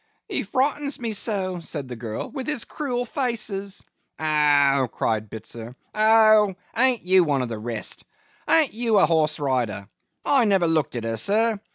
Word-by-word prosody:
'He - - -1
frightened 285 +2 -1
me 230 -2 -3
so,' 190 -4 -2
said 150 -4 -5
the 125 - -7
girl, 115 -2 -6
'with 265 -3 -6
his 300 -7 -1
cruel 250 -5 -3
faces!' 215 -6 -3 0.4
'Oh!' 145 -4 +3
cried 110 -2 -2
Bitzer. 115 +2 -8 0.2
'Oh! 215 -2 +5 0.2
An't 250 +1 +2
you 185 0 +5
one 140 -5 0
of 125 - -5
the 115 -2 -5
rest! 115 -1 -4 0.4
An't 320 -4 +4
you 225 -1 +1
a 195 - +6
horse 155 -1 +1
rider! 120 -8 -2 0.4
I 270 -4 +4
never 195 -4 +2
looked 160 -5 0
at 120 - -3
her, 115 0 -2
sir. 215 - +1
185 Hz, 165 wpm, -23 LUFS, -, 0.4 s, a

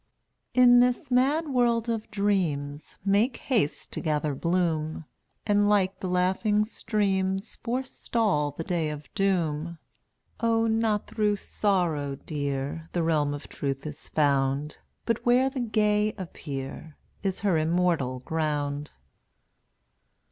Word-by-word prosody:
206 250 - +6
In 245 0 +8
this 250 +1 +2
mad 285 +6 +2
world 240 -3 +2
of 225 -2 -2
dreams 170 -9 -1
Make 210 +6 +2
haste 215 - -1
to - - -3
gather 150 -2 0
bloom, 160 0 -1 0.4
And 205 -1 +3
like 195 -2 +2
the 190 - -3
laughing 190 +4 +2
streams 195 -3 -1
Forestall 230 - -1
the 145 +3 -6
day 165 -2 -1
of 150 -1 -8
doom. 170 -4 0 0.6
Oh, 230 -1 +2
not 220 -2 +1
through 210 -1 +1
sorrow, 175 -10 0
Dear, 145 +2 -4
The 175 - +1
realm 155 -3 +2
of 145 - -9
Truth 135 0 -4
is 150 0 -7
found, 140 0 +1 0.3
But 230 -2 0
where 255 +2 +4
the 265 - -4
gay 215 -2 +2
appear 145 -4 -7 0.2
Is 195 -2 -2
her 190 -6 +2
immortal 160 -6 +1
ground. 150 -1 -2
185 Hz, 125 wpm, -27 LUFS, 150-215 Hz, 0.6 s, In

